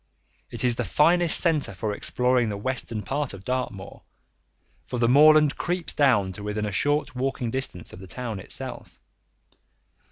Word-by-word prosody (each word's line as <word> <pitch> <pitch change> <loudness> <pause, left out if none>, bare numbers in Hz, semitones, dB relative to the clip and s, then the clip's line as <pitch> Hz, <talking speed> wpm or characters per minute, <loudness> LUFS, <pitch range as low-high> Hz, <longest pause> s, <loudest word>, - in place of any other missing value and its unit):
It - - -3
is 120 -2 +2
the - - 0
finest 170 +2 +3
centre 155 - 0
for 105 +2 -3
exploring 125 +1 +1
the 100 - -4
western 115 -1 -2
part 140 -5 -3
of 95 - -12
Dartmoor, 125 -5 -4 0.8
for 125 - -6
the 120 -1 +2
moorland 150 +3 +5
creeps 175 -1 -2
down 120 -10 +2
to 95 - -10
within 105 +1 -3
a 105 - -3
short 145 +10 0
walking 125 -2 -2
distance 130 -9 -5
of - - -10
the 95 - -11
town 115 -1 -5
itself. - - -5
125 Hz, 160 wpm, -25 LUFS, 105-145 Hz, 0.8 s, moorland